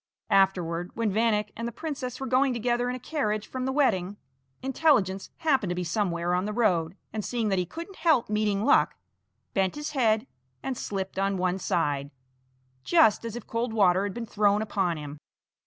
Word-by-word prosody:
Afterward, 180 -3 +2
when 225 -3 0
Vanek 210 0 +1
and 230 +1 -4
the - - -4
princess 265 -4 -5
were 270 - -3
going 260 +1 +2
together 240 +1 0
in 250 - -2
a - - -6
carriage 215 -6 -2
from 255 -1 -4
the 265 - 0
wedding, 205 -9 +1 0.5
Intelligence 260 - +2
happened 270 - +1
to 175 - -1
be 180 - -2
somewhere 175 -1 -1
on 180 +2 +1
the 210 - -3
road, 185 -6 +1 0.2
and 215 -1 -3
seeing 230 -2 -1
that 195 -2 +1
he 180 - -1
couldn't 340 - -8
help 320 -7 +3
meeting 210 -1 0
Luck, 150 - +4 0.6
bent 190 -1 +1
his 295 +1 -4
head 225 -5 +2 0.4
and 265 - -2
slipped 190 -4 -4
on 195 0 +1
one 185 +1 0
side, 145 -6 0 0.7
just 320 -13 +4
as 230 -1 -5
if 240 - -7
cold 230 0 -2
water 190 -4 +4
had 205 0 -3
been 235 -1 -4
thrown 210 -1 +2
upon 190 -5 -1
him. 145 -1 -8
210 Hz, 190 wpm, -27 LUFS, 190-250 Hz, 0.7 s, Luck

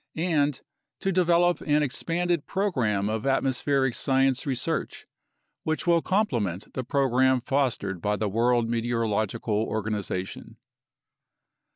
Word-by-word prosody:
," - - -53
and 155 -4 0 0.4
"to 195 - 0
develop 175 -1 +3
an 150 0 +2
expanded 170 +3 -1
program 120 - 0
of 110 +3 -2
atmospheric 135 0 +1
science 135 +1 +1
research 130 -4 -2 0.6
which 155 -3 -2
will 170 -1 +4
com 205 +6 +2
plement 100 - -3
the 130 - -3
program 130 0 +2
fostered 120 -8 -1
by 105 0 0
the 105 +1 -1
World 115 +3 +2
Meteorological 115 -2 -1
Organization." 105 -4 -4
130 Hz, 115 wpm, -26 LUFS, 110-150 Hz, 0.6 s, will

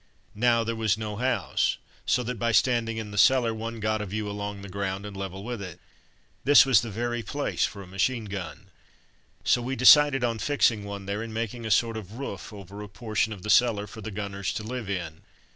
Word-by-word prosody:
Now 115 +1 +3
there 115 +1 -2
was 110 -2 +1
no 105 -2 -5
house, 120 -8 0 0.3
so 125 - +2
by 115 -1 -1
standing 115 -2 +2
in 110 -2 -5
the 100 - -2
cellar 120 -1 +5
one 115 +1 -5
got 110 0 0
a 105 - -4
view 105 +2 -3
along 100 -1 -5
the - - -7
ground 95 +1 -3
and 105 -1 -8
level 95 0 -6
with 120 -1 -5
it. 90 -4 -8 0.6
This 145 0 +7
was 130 -6 +5
the 115 - -5
very 120 +3 -2
place 140 +6 -1
for 100 -1 -9
a - - -11
machine 110 +6 -1
gun. 100 -3 -7 0.7
So 120 - +3
we 130 +3 -3
decided 135 +1 +7
on 115 -2 0
fixing 115 -5 +2
one 100 -1 -6
there 100 +2 -3
and 115 0 -6
making 115 0 -3
a - - -3
sort 115 +1 +2
of 105 -2 -8
roof 125 -2 -6
over 100 0 -9
a 105 - -8
portion 110 0 -1
of 100 -4 -8
the 105 - 0
cellar 105 -2 +4
for 110 +2 -10
the 110 - -5
gunners 100 -2 -4
to 110 - -4
live 115 -2 -5
in. 85 -4 -4
110 Hz, 215 wpm, -27 LUFS, 100-120 Hz, 0.7 s, This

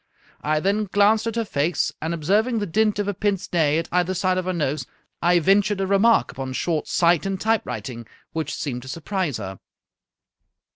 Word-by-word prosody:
I 155 +1 +1
then 200 +5 +1
glanced 205 +3 +3
at 230 - -2
her 230 -1 0
face, 160 -1 0
and 160 +1 -2
observing 205 +9 +1
the 210 - -1
dint 210 +4 +1
of 205 -1 -1
a 205 - 0
pince 195 0 -1
nez 155 -3 +3
at - - -12
either 180 +1 +1
side 185 +1 +1
of 185 - -4
her 185 - 0
nose, 150 -6 -2 0.3
I 175 +1 +4
ventured 195 +4 +3
a 195 - +1
remark 200 +4 +3
upon 130 -1 -5
short 160 +3 -1
sight 170 -2 +3
and 195 -1 -2
typewriting, 135 - -2 0.3
which 160 -1 -3
seemed 125 -4 -4
to 130 - -12
surprise 165 - -2
her." 95 -3 -7
180 Hz, 190 wpm, -23 LUFS, 155-205 Hz, 0.3 s, I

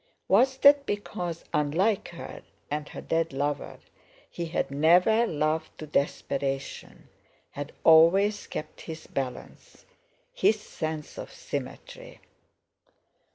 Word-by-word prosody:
Was 260 +7 +4
that 280 +1 +6
because—unlike 180 -1 -1
her 170 - -9 0.3
and 150 0 -3
her - - -8
dead 165 -2 -1
lover, 145 +1 -2 0.5
he 170 - -4
had 165 -3 -2
never 180 +11 +4
loved 155 0 -1
to 155 - -7
desperation, 140 -2 -3 0.4
had 145 +1 -6
always 185 +6 +5
kept - - -7
his 160 -1 -8
balance, 130 -2 -6 0.5
his 220 - +3
sense 155 -6 -5
of - - -7
symmetry. - - -7
165 Hz, 105 wpm, -27 LUFS, 150-205 Hz, 0.5 s, that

